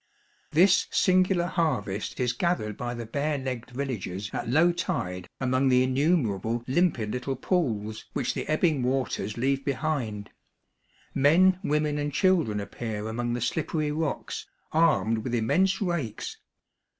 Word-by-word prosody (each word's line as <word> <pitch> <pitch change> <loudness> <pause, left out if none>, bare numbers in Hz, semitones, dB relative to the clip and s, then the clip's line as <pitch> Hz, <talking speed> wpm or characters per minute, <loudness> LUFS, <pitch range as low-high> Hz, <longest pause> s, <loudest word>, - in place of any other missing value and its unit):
This 185 +4 +4
singular 185 -1 +3
harvest 125 - -1
is 125 -1 +1
gathered 120 - -1
by 120 0 -4
the 120 -1 -5
bare 145 +6 -1
legged 130 -3 -4
villagers 110 -7 -4
at - - -3
low 160 +7 +5
tide 90 - -3
among 130 +1 +2
the 125 0 +4
innumer 130 - +2
able 115 +4 -2
limpid 130 -7 +1
little 125 +3 -2
pools 110 - -1
which - - -1
the - - -4
ebbing 155 -2 +2
waters 125 -5 -1
leave 135 +3 0
behind; 135 -7 -2 0.8
men, 175 +7 +5
women, 150 -2 0
and 145 0 -2
children 160 - +2
appear 105 +1 -5
among 120 +2 -2
the 120 - -2
slippery 150 +4 -1
rocks, 155 -1 -3 0.2
armed 155 -9 +3
with 120 +2 -2
immense 180 +13 +2
rakes. 155 - -3
130 Hz, 140 wpm, -27 LUFS, 115-160 Hz, 0.8 s, low